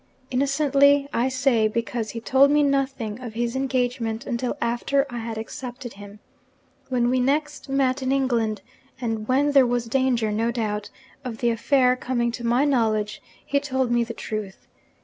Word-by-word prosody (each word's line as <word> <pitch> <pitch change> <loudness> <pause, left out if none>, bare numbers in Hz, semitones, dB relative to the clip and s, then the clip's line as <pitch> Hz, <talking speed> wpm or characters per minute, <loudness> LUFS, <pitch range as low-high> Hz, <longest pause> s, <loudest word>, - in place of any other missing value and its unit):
Innocently, 280 +1 +3
I 245 +3 +1
say 255 -4 +2
because 230 0 -3
he 230 - -5
told 265 +4 +4
me 295 0 +4
nothing 270 -5 -1
of 235 -3 -7
his 235 +1 -1
engagement 250 -4 -1
until 250 +2 -2
after 275 +3 +1
I 240 - -4
had 225 -1 -5
accepted 240 +2 -7
him. 205 +1 -12 0.7
When 245 -2 +1
we 255 - +2
next 295 +3 -1
met 270 0 +1
in 260 0 -1
England 230 -7 0 0.4
and 225 -3 -3
when 280 +3 +2
there 270 -3 +5
was 240 -1 0
danger, 240 -2 +1
no 225 +2 0
doubt, 215 -3 -2 0.3
of 245 -3 -5
the 240 0 +1
affair 250 +2 +3
coming 240 -2 -1
to 240 0 -7
my 240 +4 +2
knowledge 215 -6 0 0.2
he 280 - +1
told 260 -3 -1
me 240 0 +3
the 230 0 -6
truth. 210 -3 -6
245 Hz, 170 wpm, -24 LUFS, 230-270 Hz, 0.7 s, there